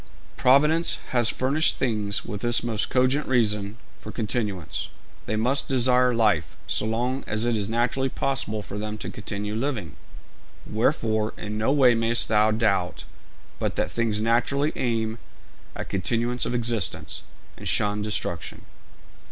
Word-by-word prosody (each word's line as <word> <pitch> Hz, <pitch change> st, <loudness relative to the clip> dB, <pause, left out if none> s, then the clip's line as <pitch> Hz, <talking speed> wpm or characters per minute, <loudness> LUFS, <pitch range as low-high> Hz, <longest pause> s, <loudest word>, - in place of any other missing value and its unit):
Providence 150 Hz, +6 st, +4 dB
has 120 Hz, -3 st, +3 dB
furnished 140 Hz, +5 st, +1 dB
things 105 Hz, -5 st, 0 dB
with 105 Hz, -3 st, -5 dB
this 120 Hz, -1 st, +3 dB
most 115 Hz, -3 st, -1 dB
cogent 130 Hz, +3 st, +2 dB
reason 105 Hz, -4 st, +1 dB, 0.2 s
for -, -, -8 dB
continuance: 105 Hz, -6 st, -2 dB, 0.4 s
they 110 Hz, -, -1 dB
must 130 Hz, +6 st, 0 dB
desire 125 Hz, -1 st, +3 dB
life, 105 Hz, -9 st, +1 dB
so 110 Hz, -, -1 dB
long 125 Hz, +4 st, -1 dB
as 105 Hz, +2 st, +1 dB
it 120 Hz, -1 st, +1 dB
is 105 Hz, -1 st, -2 dB
naturally 125 Hz, +3 st, 0 dB
possible 130 Hz, -6 st, -1 dB
for 100 Hz, -, -6 dB
them 105 Hz, 0 st, -4 dB
to -, -, -6 dB
continue 105 Hz, -2 st, -5 dB
living. 110 Hz, -, -3 dB, 0.7 s
Wherefore 110 Hz, -2 st, 0 dB
in 105 Hz, +1 st, -5 dB
no 110 Hz, +5 st, +2 dB
way 135 Hz, -4 st, +5 dB
mayst 115 Hz, +1 st, +2 dB
thou 105 Hz, 0 st, +4 dB
doubt 105 Hz, -5 st, 0 dB, 0.6 s
but -, -, -1 dB
that -, -, -1 dB
things 115 Hz, -3 st, 0 dB
naturally 120 Hz, +6 st, +1 dB
aim 115 Hz, -2 st, -1 dB, 0.6 s
at -, -, -6 dB
continuance 120 Hz, +5 st, 0 dB
of 120 Hz, -, -2 dB
existence, 115 Hz, -, -1 dB, 0.3 s
and -, -, -8 dB
shun 105 Hz, 0 st, +1 dB
destruction.' 105 Hz, -5 st, -3 dB
115 Hz, 145 wpm, -25 LUFS, 105-125 Hz, 0.7 s, way